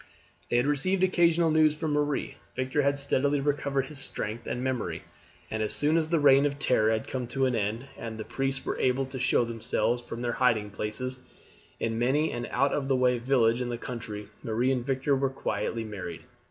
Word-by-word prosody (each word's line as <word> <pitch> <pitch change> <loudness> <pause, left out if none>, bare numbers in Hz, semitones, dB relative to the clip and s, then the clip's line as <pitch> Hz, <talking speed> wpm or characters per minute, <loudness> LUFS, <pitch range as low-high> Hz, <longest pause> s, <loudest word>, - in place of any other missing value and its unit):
They 120 - +2
had 120 - +3
received 165 +7 +2
occasional 170 -3 +3
news 155 -1 +4
from 155 0 -2
Marie. 145 -1 0 0.2
Victor 130 +3 0
had 140 0 +1
steadily 140 +1 +2
recovered 140 -1 0
his 145 0 -4
strength 115 -3 -3
and 125 - -3
memory, 130 -3 -2 0.5
and 110 - -2
as 105 - +2
soon 150 +2 +2
as 160 -1 +1
the 170 - +3
reign 140 0 +6
of 140 0 -4
terror 110 -6 +3
had 110 0 0
come 125 -2 -3
to 135 +2 0
an 130 - +1
end, 110 +3 -1
and 115 -1 -6
the 110 - -4
priests 135 +3 -3
were - - -2
able 130 +1 +2
to 130 0 -7
show 125 -1 +3
themselves 115 +1 0
from 120 0 -7
their 120 - 0
hiding 115 -4 +1
places 120 +5 -4 0.6
in 115 0 -1
many 140 +6 +2
an 120 - -4
out 140 0 +1
of 135 -2 -1
the 135 - +2
way 125 -1 +2
village 120 -1 +2
in 125 - -2
the 120 - -3
country, 115 -4 -6 0.2
Marie 120 +4 0
and 125 -1 -2
Victor 135 +1 +1
were 135 0 +1
quietly 115 -3 -3
married. 95 -6 -6
130 Hz, 205 wpm, -28 LUFS, 115-140 Hz, 0.6 s, reign